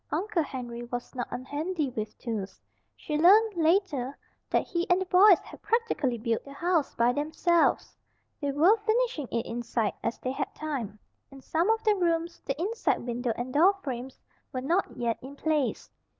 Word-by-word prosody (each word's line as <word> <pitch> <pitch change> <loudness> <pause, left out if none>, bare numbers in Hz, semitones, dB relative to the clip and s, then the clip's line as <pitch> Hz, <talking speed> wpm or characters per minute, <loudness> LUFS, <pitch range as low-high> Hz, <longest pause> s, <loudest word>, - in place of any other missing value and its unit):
Uncle 365 +3 0
Henry 245 -5 -5
was 245 0 -6
not 245 -2 -3
unhandy 290 +3 -3
with 215 -1 -4
tools. 215 -5 -5 0.4
She 300 -1 -3
learned, 420 +6 +6
later, 315 -6 +1 0.3
that - - +1
he 345 -2 -2
and 355 +1 +4
the 380 - -2
boys 370 +1 +7
had - - -13
practically 310 - 0
built 230 0 -1
the 280 - -11
house 335 0 0
by 235 +1 +3
themselves. 315 +4 +1 0.5
They 285 -1 0
were 330 +10 +5
finishing 440 - 0
it 235 +1 -2
inside, 230 -2 -2
as - - -2
they 255 - -3
had 270 - -4
time. 265 -10 -4 0.3
In 275 - -12
some 325 +8 0
of 445 0 +2
the 430 -2 +4
rooms 340 -3 -1
the 275 +2 -2
inside 415 - 0
window 245 0 -1
and 250 +1 -5
door 360 +7 +5
frames 255 -1 -5 0.3
were 255 - -3
not 340 +9 0
yet 235 -1 -1
in 270 +2 -9
place. 300 -3 -1
295 Hz, 175 wpm, -28 LUFS, 245-360 Hz, 0.5 s, boys